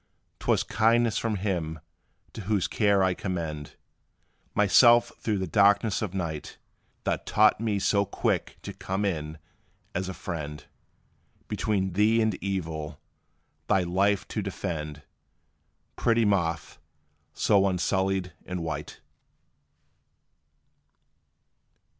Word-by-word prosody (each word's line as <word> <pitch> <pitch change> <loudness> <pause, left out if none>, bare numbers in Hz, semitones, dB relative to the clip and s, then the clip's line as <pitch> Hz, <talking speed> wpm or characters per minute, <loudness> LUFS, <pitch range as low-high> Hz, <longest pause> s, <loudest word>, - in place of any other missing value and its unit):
'T - - -11
was - - +3
kindness 115 +1 +2
from 115 -2 -1
Him, 90 -6 -2 0.5
to - - -7
whose 100 -2 +1
care 100 -3 +2
I 95 -1 +2
commend 80 -6 -4 0.8
Myself 120 +4 +6
through 105 -2 -1
the 95 - -1
darkness 100 +4 +3
of 100 -4 -3
night, 80 -5 -4 0.5
That - - -2
taught 105 -1 +4
me 110 -2 0
so 100 +1 +2
quick - - -1
to - - -6
come 95 +2 -3
in, 80 -4 -3 0.6
as 95 +1 -2
a 95 - -6
friend, 75 -4 -6 0.8
Between 95 -4 -1
thee 105 +4 +3
and 110 -1 +2
evil, 80 -6 -3 0.7
thy 95 - +3
life 95 +3 +1
to 110 - -2
defend; 80 -6 -5 0.9
Pretty 115 -1 +2
Moth, 85 -5 0 0.5
so 100 -1 +3
unsullied 95 0 0
and 90 -2 -4
white. 75 -2 -5
95 Hz, 110 wpm, -27 LUFS, 85-105 Hz, 0.9 s, Myself